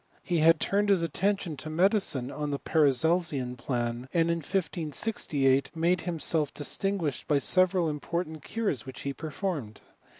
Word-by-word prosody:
He 175 -3 0
had 165 +1 +5
turned 205 +1 +1
his 190 -4 +3
atten* 190 +6 +1
tion 170 -6 -6
to 155 - -6
medicine 170 - +1
on 150 -1 -3
the 140 - -1
Paracelsian 150 -3 +2
plan, 120 0 -3
and 170 -1 +2
in 170 0 -1
156ft 155 -5 0
made 170 +2 +2
himself 160 -3 0
distinguished 165 -1 -2
by 145 - +3
several 185 +3 +3
important 160 +1 -3
curei 200 - -2
which 130 -1 -9
he 140 - -3
performed. 150 - -4
160 Hz, 145 wpm, -28 LUFS, 140-180 Hz, -, had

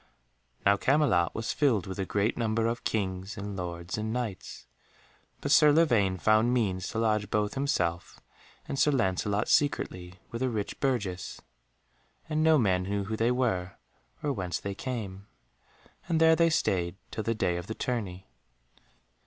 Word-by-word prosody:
Now 100 0 +5
Camelot 130 - +2
was 110 +1 -2
filled 125 - +2
with 95 +1 -6
a 95 - -2
great 105 +3 0
number 115 -1 0
of 115 +1 -2
Kings 95 -1 -2
and 100 0 -5
Lords 85 +1 -4
and 110 +1 -2
Knights, 115 -5 -5 0.8
but - - -2
Sir 150 -1 +7
Lavaine 120 - +3
found 110 +6 +3
means 100 -7 0
to - - -5
lodge 105 -2 +1
both 105 -1 0
himself 90 -12 -1 0.5
and 135 - -3
Sir 150 - +4
Lancelot 105 -4 0
secretly 90 -11 0 0.2
with 115 - -5
a 130 - +1
rich 105 -4 -4
burgess, 105 -10 -2 0.9
and 155 0 0
no 160 -1 +5
man 95 -8 +2
knew 100 +2 -2
who 110 +3 -3
they 115 +2 +1
were 110 -8 0 0.5
or 145 -1 0
whence 90 -7 -3
they 100 - -4
came. 100 -4 -5 0.8
And 165 -2 +2
there 160 0 +6
they 165 +1 +4
stayed 90 - 0 0.2
till 110 - -3
the 115 +1 0
day 90 -5 0
of 85 +1 -6
the 110 - -4
tourney. 100 -7 -3
105 Hz, 160 wpm, -29 LUFS, 95-125 Hz, 0.9 s, Sir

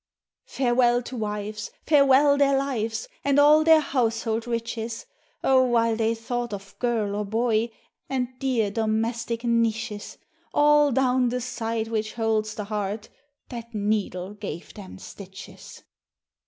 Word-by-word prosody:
Farewell 245 -1 +2
to 255 - -7
wives, 210 -1 -4 0.2
farewell 280 -1 +5
their 280 -1 +3
lives, 240 - -2 0.2
And 280 0 +2
all 300 +2 +6
their 320 -1 +6
household 230 -4 -1
riches; 230 -1 -4 0.4
Oh! 260 -1 +5
while 230 -2 +2
they 225 0 +1
thought 240 0 -4
of 195 0 -12
girl 225 -5 0
or 210 - -1
boy, 225 +2 0 0.4
And 255 -2 -1
dear 240 -6 0
domestic 225 +2 -1
niches, 230 -2 -1 0.4
All 295 -1 +5
down 255 -1 +2
the 250 +1 -2
side 230 -2 -3
which 220 -1 -2
holds 220 -2 -1
the 210 - -4
heart, 210 0 -4 0.4
That 235 -2 -8
needle 205 -2 -1
gave 200 -5 -7
them 195 -3 -10
stitches. 190 0 -11
230 Hz, 130 wpm, -25 LUFS, 215-250 Hz, 0.4 s, all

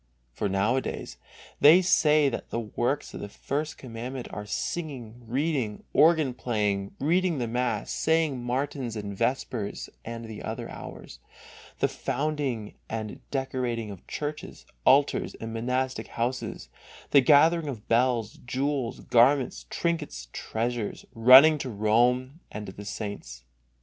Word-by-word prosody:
For 100 - -2
nowadays 105 +7 -1 0.4
they 165 +6 +8
say 150 -4 +4
that 135 - -3
the 115 - -2
works 120 +5 -2
of - - -6
the 105 - -6
First 145 +7 -3
Commandment 125 +1 -6
are 105 0 -6
singing, 125 -5 -4
reading, 130 -4 -1
organ 155 -4 +5
playing, 105 -5 -1
reading 175 +3 +2
the 120 -3 -1
mass, 125 +2 -1
saying 160 -6 +1
matins 130 -1 -2
and 100 -2 -5
vespers 115 -2 -2
and 115 0 -6
the 110 -2 -8
other - - -5
hours, - - -9 0.6
the - - +4
founding 140 -6 -2 0.2
and 110 -1 -4
decorating 125 -5 -2
of 95 - -12
churches, 150 +1 -5 0.2
altars, 140 +2 +3
and 115 0 -7
monastic 125 +1 -1
houses, 125 +2 -3 0.4
the 140 - +7
gathering 155 +4 +5
of 120 -7 -6
bells, 115 -2 +1
jewels, 130 0 -2
garments, 130 +3 +3
trinkets 160 - -2
and - - -33
treasures, 115 -1 -3
running 130 +7 +8
to 135 - -4
Rome 120 +6 +2
and 105 0 -6
to 95 - -7
the 100 +2 -10
saints. 100 - -6
125 Hz, 135 wpm, -27 LUFS, 110-145 Hz, 0.6 s, they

